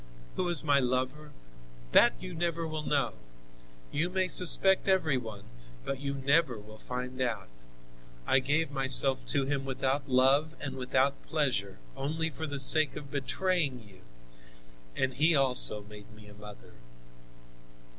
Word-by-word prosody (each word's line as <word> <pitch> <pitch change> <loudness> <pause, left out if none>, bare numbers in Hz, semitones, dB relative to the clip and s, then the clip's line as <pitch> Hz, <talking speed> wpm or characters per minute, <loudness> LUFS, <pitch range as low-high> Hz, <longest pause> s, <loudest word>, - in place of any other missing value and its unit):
Who 185 - -2
was 175 -5 +2
my 145 -2 +3
lover? 130 +4 -2 0.6
That - - +6
you - - -8
never 170 0 -3
will 155 -1 -5
know! 140 -5 -1 0.8
You 160 +4 -1
may 185 0 -1
suspect 190 +3 +5
every 180 -7 +2
one, 110 -5 -8 0.4
but 135 - -4
you 140 0 -4
never 140 -1 +1
will 110 +1 -14
find 125 +1 -6
out. 115 - -2 0.8
I 135 - +3
gave 150 +3 0
myself 135 0 +2
to 140 -2 -1
him, 140 0 -2
without 135 +1 -2
love 135 +5 +2
and 135 -2 -5
without 130 +2 0
pleasure, 130 -11 -2 0.2
only 160 +4 -3
for 160 +2 -6
the 145 -1 -4
sake 155 +2 +3
of 145 -2 -9
betraying 145 -1 -2
you, 95 -2 -17 0.9
and 130 0 -1
he 155 +4 +2
also 125 -6 +4
made 105 0 -14
me 105 0 -16
a 105 - -14
mother. 105 0 -14
135 Hz, 145 wpm, -29 LUFS, 125-155 Hz, 0.9 s, That